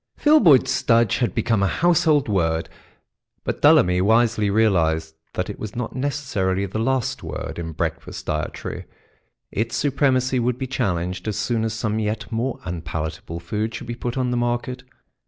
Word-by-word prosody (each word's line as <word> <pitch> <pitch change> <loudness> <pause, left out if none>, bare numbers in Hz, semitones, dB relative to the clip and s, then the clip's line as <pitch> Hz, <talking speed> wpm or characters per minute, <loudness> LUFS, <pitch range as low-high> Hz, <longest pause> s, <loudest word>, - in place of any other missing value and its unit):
Filboid 215 - +6
Studge 115 -2 +2
had 120 -7 0
become 115 -4 +1
a 100 - +3
household 165 - +3
word, 85 -5 0 0.7
but - - -3
Dullamy 90 0 +5
wisely 110 0 +3
realised 80 -7 +2 0.2
that - - -2
it - - -7
was 110 - -6
not 120 -1 -4
necessarily 130 -9 -1
the 100 +3 -4
last 130 +2 0
word 80 0 -5
in 80 -1 -4
breakfast - - -4
dietary; 75 0 -4 0.7
its 115 +3 -2
supremacy 135 -2 +1
would 120 0 0
be 130 - -3
challenged 90 -7 -2
as 105 - -2
soon 115 -2 0
as 110 -1 -1
some 110 0 -1
yet 105 +1 -3
more 125 +4 -2
unpalatable 80 -1 -5
food 105 +6 -3
should - - -6
be 120 - -4
put 120 +1 -4
on 125 -1 0
the 125 - 0
market. 120 +1 -1
110 Hz, 160 wpm, -22 LUFS, 95-125 Hz, 0.7 s, Filboid